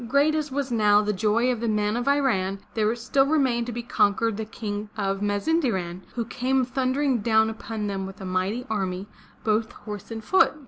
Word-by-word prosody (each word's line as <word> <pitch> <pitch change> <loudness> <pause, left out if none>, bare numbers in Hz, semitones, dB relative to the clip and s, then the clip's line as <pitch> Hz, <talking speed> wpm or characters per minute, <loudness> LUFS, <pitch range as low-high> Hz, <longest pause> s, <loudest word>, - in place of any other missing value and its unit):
Great 280 +5 +3
as 305 -2 -1
was 275 -1 -2
now 210 -3 +5
the 210 0 0
joy 220 +5 +2
of 240 - -2
the 235 - -2
men 210 0 +1
of 240 +2 -2
Iran, 235 -10 +2 0.2
there 220 +1 +1
still 270 +3 +2
remained 260 -6 +2
to - - -3
be 240 +1 -4
conquered 225 -1 +2
the 220 +1 -4
King 210 -1 -5
of 195 -1 -1
Mazinderan, 205 - 0
who 235 -2 -1
came 255 +2 0
thundering 260 +1 +1
down 220 0 +3
upon 220 -1 -5
them 195 -1 -3
with 195 +1 -10
a 190 - -7
mighty 185 +7 -1
army, 190 -4 -2 0.4
both 220 +1 +1
horse 210 -3 -8
and 225 -1 -6
foot. 380 - +4
220 Hz, 195 wpm, -25 LUFS, 205-255 Hz, 0.4 s, now